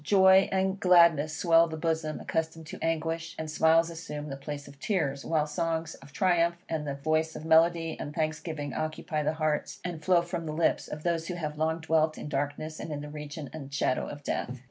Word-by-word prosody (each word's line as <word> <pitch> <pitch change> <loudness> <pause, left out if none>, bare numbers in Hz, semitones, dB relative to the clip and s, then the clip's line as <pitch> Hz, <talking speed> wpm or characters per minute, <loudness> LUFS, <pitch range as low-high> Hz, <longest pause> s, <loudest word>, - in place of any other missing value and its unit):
Joy 190 +2 +6
and 190 0 0
gladness 170 -5 +5
swell 165 -1 +5
the 160 -1 -6
bosom 160 -1 -1
accustomed 160 0 -3
to - - -8
anguish, 165 0 -2
and 160 -1 -4
smiles 165 +2 +4
assume 150 -2 -6
the 135 - -4
place 145 +1 -7
of 140 0 -14
tears, 145 -8 -1
while 155 -2 +1
songs 160 +1 -2
of 140 +1 -14
triumph, 170 +1 +2
and 155 -2 -3
the 140 - -2
voice 155 +3 0
of 155 - -7
melody 165 0 +3
and 145 - -5
thanksgiving 155 -2 -3
occupy 155 0 -2
the 150 - 0
hearts, 155 -1 -1
and 170 -3 -5
flow 175 0 +4
from 170 -1 -4
the 155 - -3
lips, 165 +1 +1
of 150 0 -7
those 170 -1 0
who 180 - -3
have 150 -3 -4
long 160 +1 0
dwelt 160 -1 +2
in - - -6
darkness, 145 +3 -3
and 160 - -6
in 145 -1 -4
the 150 - -7
region 150 0 -7
and 140 -3 -8
shadow 135 -2 0
of 145 0 -8
death. 130 -2 -3
160 Hz, 210 wpm, -29 LUFS, 150-165 Hz, -, Joy